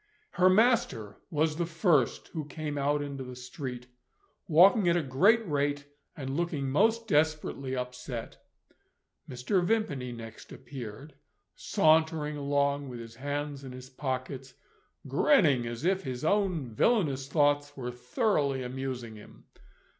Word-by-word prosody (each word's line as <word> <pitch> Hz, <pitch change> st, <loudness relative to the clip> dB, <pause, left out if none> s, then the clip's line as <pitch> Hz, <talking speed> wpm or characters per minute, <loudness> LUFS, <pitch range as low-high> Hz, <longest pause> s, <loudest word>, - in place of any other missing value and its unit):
Her 185 Hz, +1 st, +4 dB
master 190 Hz, -, +2 dB
was 155 Hz, 0 st, +1 dB
the 170 Hz, -, 0 dB
first 160 Hz, -, +1 dB
who 155 Hz, -4 st, -5 dB
came 150 Hz, 0 st, -5 dB
out 145 Hz, +1 st, 0 dB
into 140 Hz, -2 st, -5 dB
the 125 Hz, 0 st, -8 dB
street; 125 Hz, 0 st, -7 dB, 0.6 s
walking 185 Hz, +4 st, +6 dB
at 170 Hz, -, +3 dB
a 170 Hz, -, 0 dB
great 200 Hz, -, +3 dB
rate, 145 Hz, -1 st, -1 dB, 0.3 s
and 135 Hz, -2 st, -4 dB
looking 150 Hz, -5 st, -1 dB
most 225 Hz, +8 st, +2 dB
desperately 150 Hz, -5 st, 0 dB
upset. 125 Hz, -1 st, -6 dB, 0.9 s
Mr. 130 Hz, +10 st, 0 dB
Vimpany 175 Hz, -, -1 dB
next 115 Hz, -1 st, -10 dB
appeared, 135 Hz, +2 st, -9 dB, 0.4 s
sauntering 160 Hz, -4 st, +2 dB
along 140 Hz, -1 st, 0 dB
with 120 Hz, -1 st, -7 dB
his 115 Hz, -1 st, -9 dB
hands 145 Hz, +1 st, -4 dB
in 130 Hz, -2 st, -8 dB
his 130 Hz, +1 st, -11 dB
pockets, 130 Hz, 0 st, -4 dB, 0.5 s
grinning 145 Hz, -, +3 dB
as 120 Hz, +5 st, -5 dB
if 190 Hz, +1 st, +2 dB
his 130 Hz, -1 st, -5 dB
own 180 Hz, -, +1 dB
villainous 140 Hz, -, +1 dB
thoughts 145 Hz, 0 st, +1 dB
were 125 Hz, -2 st, -4 dB
thoroughly 135 Hz, -, 0 dB
amusing 125 Hz, -3 st, -5 dB
him. 105 Hz, -, -15 dB
145 Hz, 130 wpm, -29 LUFS, 130-160 Hz, 0.9 s, walking